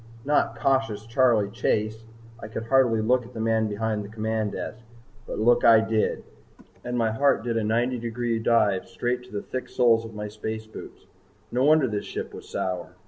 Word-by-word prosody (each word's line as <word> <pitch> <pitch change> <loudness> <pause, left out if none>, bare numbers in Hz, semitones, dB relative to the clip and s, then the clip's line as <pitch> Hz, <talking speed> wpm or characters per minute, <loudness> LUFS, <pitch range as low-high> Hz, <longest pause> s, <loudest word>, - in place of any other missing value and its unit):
Not 145 +1 +1
Cautious 135 -7 0
Charley 115 -4 +2
Chase! 110 -1 -1 0.3
I 110 - -7
could 110 +1 -5
hardly 120 -3 +3
look 125 +3 +2
at 120 +2 -15
the - - -5
man 110 0 +1
behind 105 0 -2
the 100 - -9
command 110 -1 -2
desk. - - -5 0.5
But - - -5
look 120 +2 +3
I 115 -1 +8
did 110 -1 0 0.6
and 125 0 -3
my 115 -2 +1
heart 140 +2 +2
did 120 -1 -2
a 115 - 0
ninety 120 +3 0
degree 115 0 -2
dive 105 -4 +2
straight 125 +1 -2
to - - -17
the 105 -1 -4
thick 130 - -5
soles 115 -2 +3
of 115 -1 -10
my 105 0 -4
space 110 +1 -5
boots. 110 - -11 0.5
No 125 +3 +1
wonder 155 -2 +5
this 105 -3 -3
ship - - -6
was - - -11
sour. 90 -1 -4
115 Hz, 195 wpm, -25 LUFS, 110-120 Hz, 0.6 s, I